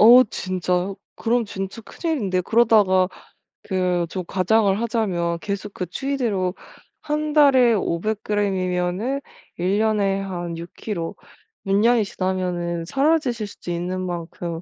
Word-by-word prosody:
어 240 +4 +10
진짜요? 185 -2 -2 0.2
그럼 235 +1 +1
진짜 195 +1 -5
큰일인데 215 - -1
그러다가 205 -4 +4 0.6
그 180 -3 0
좀 185 +1 -4
과장을 195 +2 +2
하자면 185 -8 0
계속 200 +1 -4
그 180 - -3
추이대로 210 -3 -1 0.5
1 305 0 -1
달에 265 -5 +6
500 210 +1 -1
그램이면은 195 +4 0 0.4
1 185 +3 +1
년에 205 -3 +2
한 175 -3 -4
6 170 +1 -8
킬로 175 -7 -4 0.5
6 195 0 +2
년이 230 +2 +4
지나면은 180 -3 -2
사라지실 270 - +1
수도 180 - -8
있는 180 +2 -2
만큼 170 -1 -4
195 Hz, 240 characters per minute, -23 LUFS, 180-225 Hz, 0.6 s, 어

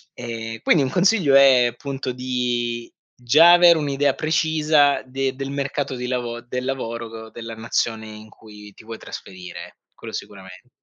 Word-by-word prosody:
e 115 -2 -6
quindi 155 - +4
un 130 - 0
consiglio 180 -5 +3
è 130 -3 +6
appunto 135 +2 -5
di 120 -2 -3 0.2
già 155 +8 +6
avere 175 -1 +7
un'idea 140 -2 0
precisa 155 -2 +2
de 135 +1 -3
del 135 +1 -5
mercato 140 0 -3
di 125 0 -5
lavo 120 -2 -3
del 125 +2 -5
lavoro 115 -4 -5
della 115 0 -9
nazione 110 0 -2
in 110 0 -12
cui 105 -2 -15
ti - - -17
vuoi 115 0 -8
trasferire, 90 -4 -10 0.2
quello - - -11
sicuramen 95 +3 -10
125 Hz, 150 wpm, -22 LUFS, 115-140 Hz, 0.2 s, avere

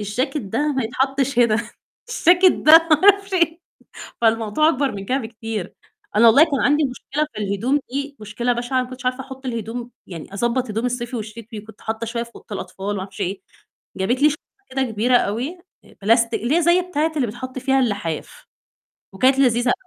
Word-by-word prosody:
"الجاكت 250 +8 -2
ده 245 +8 -1
ما 265 -2 -1
يتحطش 270 +2 -1
هنا، 235 -1 +2 0.6
الجاكت 360 +1 +7
ده 305 - +3 0.2
ما 310 - +7
أعرفش 400 0 +5
إيه." 335 -1 +1 0.6
فالموضوع 225 +5 +2
أكبر 280 -5 0
من 195 -1 -6
كده 255 +7 0
بكتير. 225 -4 -6 0.4
أنا 235 - +6
والله 255 +8 +8
كان 280 -5 -2
عندي 295 +2 +3
مشكلة 280 +3 -3
في 210 - -5
الهدوم 225 +9 0
دي 280 +2 -4
مشكلة 220 +4 -2
بشعة، 245 +2 -1
ما 250 - -9
كنتش 255 0 -10
عارفة 255 +1 0
أحط 265 0 -9
الهدوم، 235 0 -5 0.2
يعني 165 -4 -9
أضبّط 240 +4 -1
هدوم 225 +4 -1
الصيفي 245 0 -3
والشتوي، 220 +1 -8
وكنت 215 0 -16
حاطة 220 +1 -4
شوية 235 +1 -3
في 235 - -10
أوضة - - -15
الأطفال 190 0 -6
وما 205 -2 -2
أعرفش 190 +2 -9
إيه. 195 +1 -2 0.6
جابت 240 +8 0
لي 300 - +7
شنطة 295 - -6 0.3
كده 265 +1 -1
كبيرة 245 0 +2
أوي 245 - -1 0.3
آآ - - -20
بلاستيك 230 0 +2
اللي 260 +7 +1
هي 345 - +2
زي 345 +2 +4
بتاعة 325 -3 -1
اللي 265 - +1
بيتحط 255 +4 -7
فيها 270 +1 +2
اللحاف، 200 -9 -3 0.7
وكانت 260 +8 +3
لذيذة، 245 0 +3
245 Hz, 185 wpm, -21 LUFS, 220-275 Hz, 0.7 s, والله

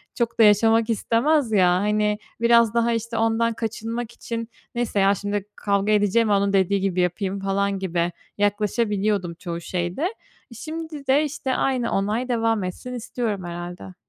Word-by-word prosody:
çok 235 -1 -2
da - - +8
yaşamak 225 +2 +4
istemez, 235 +4 +1
ya. 185 -4 +4
Hani, 210 +3 +1 0.2
biraz 235 -2 +5
daha, 235 0 +2
işte, 230 0 -3
ondan 225 +1 +2
kaçınmak 225 +1 -4
için, 230 -1 -6 0.3
neyse 240 -4 -1
ya 195 +1 +4
şimdi 205 0 -3
kavga 200 0 0
edeceğime 210 +1 +3
onun 200 0 +2
dediği 195 0 +2
gibi 190 -2 0
yapayım, 190 +2 -1
falan 195 0 0
gibi 175 -2 -1 0.3
yaklaşabiliyordum 205 -2 0
çoğu 170 0 -6
şeyde. 180 - -2 0.4
Şimdi 310 -1 -7
de, 275 +3 +4
işte, 275 -3 -2
aynı 255 -3 0
onay 215 +6 -1
devam 225 -3 +1
etsin 185 +7 -6
istiyorum, 230 -4 -3
herhâlde. 175 - -7
210 Hz, 150 wpm, -23 LUFS, 195-235 Hz, 0.4 s, da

